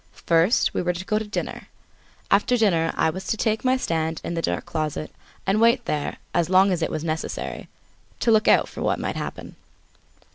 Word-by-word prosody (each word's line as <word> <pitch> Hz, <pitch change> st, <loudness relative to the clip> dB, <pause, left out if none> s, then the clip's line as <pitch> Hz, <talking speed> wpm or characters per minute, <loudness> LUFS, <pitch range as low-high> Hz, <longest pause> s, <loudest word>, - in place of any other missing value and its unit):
First 170 Hz, +7 st, +3 dB
we -, -, 0 dB
were 180 Hz, 0 st, 0 dB
to 180 Hz, +2 st, -6 dB
go 215 Hz, 0 st, +1 dB
to 220 Hz, -, -6 dB
dinner; 210 Hz, -, -5 dB, 0.6 s
after 210 Hz, +5 st, +3 dB
dinner, 170 Hz, -7 st, +2 dB
I 160 Hz, -, +2 dB
was 190 Hz, +2 st, -7 dB
to 220 Hz, -, 0 dB
take 220 Hz, 0 st, 0 dB
my 260 Hz, 0 st, +3 dB
stand 160 Hz, -7 st, -1 dB
in -, -, -4 dB
the 165 Hz, -, -1 dB
dark 90 Hz, -, -2 dB
closet 155 Hz, -1 st, -3 dB, 0.3 s
and 195 Hz, +3 st, +2 dB
wait 235 Hz, +1 st, +4 dB
there 150 Hz, -7 st, -2 dB, 0.2 s
as 175 Hz, -1 st, +1 dB
long 190 Hz, +1 st, +5 dB
as 175 Hz, -2 st, -1 dB
it -, -, 0 dB
was 155 Hz, -, -4 dB
necessary 160 Hz, -1 st, -4 dB, 0.5 s
to 235 Hz, -, +3 dB
look 220 Hz, -1 st, +4 dB
out -, -, +5 dB
for -, -, -9 dB
what -, -, +1 dB
might -, -, -3 dB
happen. -, -, -6 dB
185 Hz, 205 wpm, -24 LUFS, 165-215 Hz, 0.6 s, long